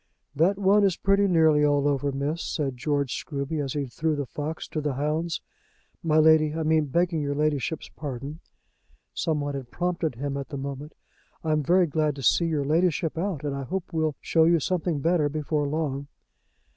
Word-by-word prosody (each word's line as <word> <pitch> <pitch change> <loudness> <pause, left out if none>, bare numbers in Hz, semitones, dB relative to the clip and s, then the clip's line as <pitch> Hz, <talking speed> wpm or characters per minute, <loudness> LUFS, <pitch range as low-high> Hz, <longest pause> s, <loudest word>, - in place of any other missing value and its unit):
"That 175 +7 +3
one 200 +1 +4
is 195 -4 +2
pretty 195 +1 +3
nearly 160 -4 +4
all 145 -1 +3
over, 145 0 0
miss," 140 +4 -2
said 140 -4 -2
George 140 0 -1
Scruby, 145 +1 -3
as 135 - -3
he 145 -1 -1
threw 155 +5 -1
the 145 -1 -2
fox 150 +4 -5
to 155 - -3
the 145 -3 -2
hounds. 155 +4 -1 0.6
"My 155 -2 +2
Lady, 155 -1 +5
I 160 - -1
mean, 155 0 +3
begging 170 +2 +1
your 145 0 -2
Ladyship's 150 +1 -1
pardon." 140 +1 -6 0.7
Some 155 -3 -1
one 145 0 -3
had 135 -3 -6
prompted 175 -4 -2
him 140 +3 -3
at 140 - -5
the 145 - -5
moment. 140 +2 -6 0.5
"I'm 155 -1 +1
very 175 +5 +4
glad 155 -2 0
to 135 - -7
see 170 - +4
your 155 -4 0
Ladyship 165 +1 +1
out, 170 -3 -2
and 145 -2 -2
I 140 - -4
hope 180 +6 -4
we'll 155 -2 0
show 160 -1 +3
you 170 0 +4
something 170 -2 -1
better 165 -1 +2
before 150 0 -1
long." 140 -2 -2
150 Hz, 190 wpm, -26 LUFS, 140-165 Hz, 0.7 s, Lady